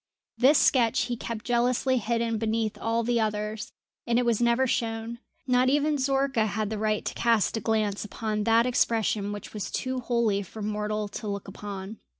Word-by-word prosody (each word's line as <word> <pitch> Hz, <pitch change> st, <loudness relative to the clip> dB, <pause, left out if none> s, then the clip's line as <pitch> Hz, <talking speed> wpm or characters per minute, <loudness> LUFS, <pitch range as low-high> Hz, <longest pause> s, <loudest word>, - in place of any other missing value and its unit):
This 275 Hz, +4 st, +5 dB
sketch 235 Hz, -4 st, +3 dB
he 245 Hz, 0 st, -2 dB
kept 230 Hz, -1 st, -6 dB
jealously 245 Hz, +1 st, +2 dB
hidden 230 Hz, 0 st, -1 dB
beneath 220 Hz, -1 st, -1 dB
all 230 Hz, +1 st, -1 dB
the 235 Hz, 0 st, +1 dB
others, 215 Hz, 0 st, -2 dB, 0.4 s
and 235 Hz, 0 st, +2 dB
it 245 Hz, -, +2 dB
was 235 Hz, -1 st, +1 dB
never 235 Hz, +2 st, +3 dB
shown 230 Hz, -1 st, -2 dB, 0.3 s
not 255 Hz, 0 st, +3 dB
even 295 Hz, +2 st, +2 dB
Zorka 270 Hz, -4 st, +1 dB
had 215 Hz, 0 st, -2 dB
the 215 Hz, -, -3 dB
right 215 Hz, -1 st, 0 dB
to -, -, -2 dB
cast 230 Hz, -4 st, +2 dB
a -, -, -1 dB
glance 215 Hz, -3 st, 0 dB
upon 215 Hz, 0 st, -3 dB
that 230 Hz, +1 st, +4 dB
expression 225 Hz, -4 st, +1 dB
which 205 Hz, -1 st, -7 dB
was 210 Hz, -2 st, -4 dB
too 260 Hz, 0 st, -2 dB
holy 235 Hz, -4 st, +1 dB
for 210 Hz, +3 st, -8 dB
mortal 210 Hz, 0 st, -2 dB
to 215 Hz, +1 st, -6 dB
look 200 Hz, 0 st, -4 dB
upon. 200 Hz, +1 st, -7 dB
225 Hz, 180 wpm, -27 LUFS, 210-240 Hz, 0.4 s, This